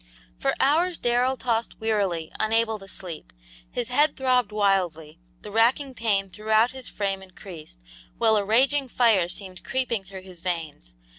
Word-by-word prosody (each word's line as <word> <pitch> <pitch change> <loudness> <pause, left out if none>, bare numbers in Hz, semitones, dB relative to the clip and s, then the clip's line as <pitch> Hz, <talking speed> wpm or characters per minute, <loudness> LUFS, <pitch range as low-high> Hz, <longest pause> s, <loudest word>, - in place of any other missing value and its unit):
For - - +1
hours 330 +6 +3
Darrell 245 +2 +1
tossed 230 -2 -2
wearily, 200 -7 -1
unable 220 0 +1
to 195 - -12
sleep. 175 -4 -9 0.4
His 240 -1 -3
head 290 +4 +3
throbbed 250 -4 +2
wildly, 180 -6 0 0.2
the 210 - -8
racking 245 +5 +2
pain 205 -5 0
throughout 220 +3 +2
his 260 -1 -8
frame 195 -2 -2
increased, 180 - -12 0.4
while 220 -1 +4
a 205 - +2
raging 265 +7 +2
fire 220 -8 +3
seemed 185 0 -8
creeping 250 -6 -1
through 190 0 -10
his 185 -2 -12
veins. 160 - -4
215 Hz, 150 wpm, -25 LUFS, 185-245 Hz, 0.4 s, while